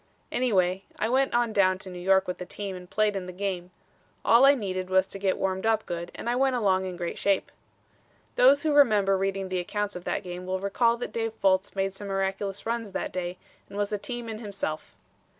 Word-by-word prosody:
Anyway, 190 -6 +1
I 220 - 0
went 265 +1 +2
on 240 -2 +2
down 185 -2 +3
to 190 0 -9
New 180 - -7
York 190 +1 +3
with 180 - -4
the 180 - -5
team 200 -2 -5
and 180 -1 -10
played 215 -1 +1
in 185 -2 -4
the - - -5
game. 180 -1 -3 0.6
All 235 +4 +7
I 280 +1 +7
needed 185 -6 -3
was 190 0 +4
to 195 - -9
get 190 -1 +1
warmed 190 +2 -1
up 220 -1 +2
good 170 0 -5
and - - -7
I 240 - +1
went 265 0 +2
along 190 -5 +2
in 180 -1 -5
great 170 -1 -4
shape." 200 -1 +1 0.8
Those 275 +3 +6
who 310 -2 +2
remember 210 -9 +5
reading 195 0 -1
the 185 -1 -1
accounts 205 +3 -3
of 180 - -7
that - - -1
game 180 0 -7
will 185 0 -1
recall 230 +4 +2
that 245 - -5
Dave 225 -1 -2
Fultz 190 0 +2
made 195 0 0
some 200 +1 -8
miraculous 195 0 -2
runs 230 -3 -3
that - - -3
day 180 0 -3 0.3
and 200 - -8
was 205 0 -1
a - - +1
team 240 +2 -5
in 220 -1 -5
himself. 195 -8 -5
195 Hz, 225 wpm, -27 LUFS, 185-225 Hz, 0.8 s, All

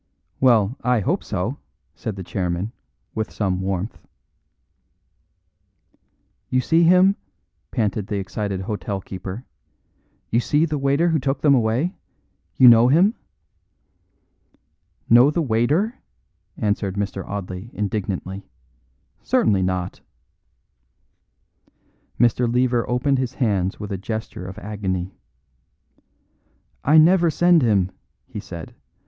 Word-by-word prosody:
"Well, 120 -3 +4
I 125 -2 +2
hope - - -1
so," - - -3 0.3
said 110 - -5
the 95 - -6
chairman, 90 +2 -2 0.4
with 110 0 -3
some 95 -3 -1
warmth. 95 +2 -3 2.5
"You 130 - +2
see 165 +6 +3
him?" 180 +3 +5 0.5
panted 105 -2 -1
the 105 - -2
excited 100 0 -3
hotel 100 -1 -4
keeper; 95 +5 -7 0.9
"you 115 - +3
see 150 +6 +2
the 150 -3 -2
waiter 140 +5 +2
who 160 -2 +2
took 135 +1 -2
them 145 -2 +5
away? 125 - +1 0.6
You 130 - +8
know 115 0 +8
him?" 175 - +4 1.9
"Know 120 +4 +7
the 165 +2 0
waiter?" 145 - +1 0.6
answered 100 -2 -1
Mr. 100 -1 -3
Audley 95 +1 -6
indignantly. 100 -2 -4 0.7
"Certainly 100 -4 +2
not!" 90 -1 -2 2.2
Mr. 120 0 +3
Lever 125 -1 +1
opened 125 +2 +1
his 130 -1 -3
hands 100 -7 0
with 105 -1 -6
a 95 - -3
gesture 110 -3 -5
of 95 - -9
agony. 95 -2 -4 1.7
"I 150 +3 +5
never 170 +2 +5
send 175 +1 +4
him," 100 -6 +2 0.3
he - - -7
said. 90 -5 -9
110 Hz, 110 wpm, -22 LUFS, 95-135 Hz, 2.5 s, You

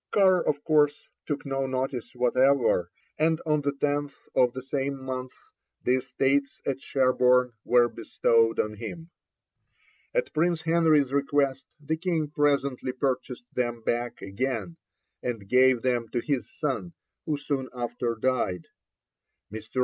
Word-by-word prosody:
Carr, 190 -3 +4
of 145 -1 -1
course, 150 -2 +2 0.2
took 145 0 -3
no 135 -1 -1
notice 130 -2 -3
whatever, 125 -6 +3 0.3
and 160 +1 +2
on 150 -1 +2
the 145 0 0
10th 145 0 -2
of 125 -1 +4
the 130 - -6
same 135 0 -2
month 130 -1 -5 0.5
the 125 +1 +3
estates 135 +2 0
at 135 -1 -2
Sherborne 125 -2 +3
were 120 -1 +4
bestowed 115 0 +1
on 105 - 0
him. 165 +10 -8 1.0
At - - -1
Prince 170 +1 +1
Henry's 160 -5 +3
request 140 -1 +1
the 155 +2 -2
King 165 -3 -1
presently 140 -3 +1
purchased 125 -2 -2
them 120 -2 -1
back 120 +1 -2
again, 100 -4 -3 0.4
and 115 -5 -4
gave 125 +1 +4
them 120 -3 0
to 120 - +1
his 125 -4 -2
son, 150 +4 -3 0.3
who 150 -2 0
soon 140 -2 -3
after 120 -1 -3
died. 110 -8 -1 0.8
Mr. 110 +4 -5
130 Hz, 135 wpm, -27 LUFS, 125-145 Hz, 1.0 s, Carr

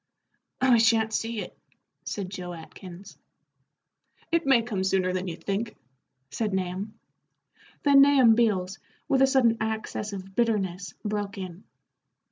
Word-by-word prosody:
"We 250 -3 +5
sha'n't 225 -1 +3
see 225 -1 -2
it," - - -9 0.5
said 195 -3 -4
Joe 180 -2 -6
Atkins. 180 +3 -11 1.1
"It 335 -3 +1
may 255 -4 +5
come 205 -5 -3
sooner 190 -1 +1
than 185 0 -2
you 170 - -4
think," 205 +5 -3 0.6
said 210 +1 -2
Nahum. 190 +3 -3 0.9
Then 280 -1 +7
Nahum 275 -5 +6
Beals, 195 -5 +1 0.3
with 270 -3 +2
a 270 - +6
sudden 245 -4 +3
access 220 -1 -3
of 195 -1 -8
bitterness, 195 -6 -1
broke 205 -1 -3
in. 185 0 -8
210 Hz, 130 wpm, -26 LUFS, 190-230 Hz, 1.1 s, Then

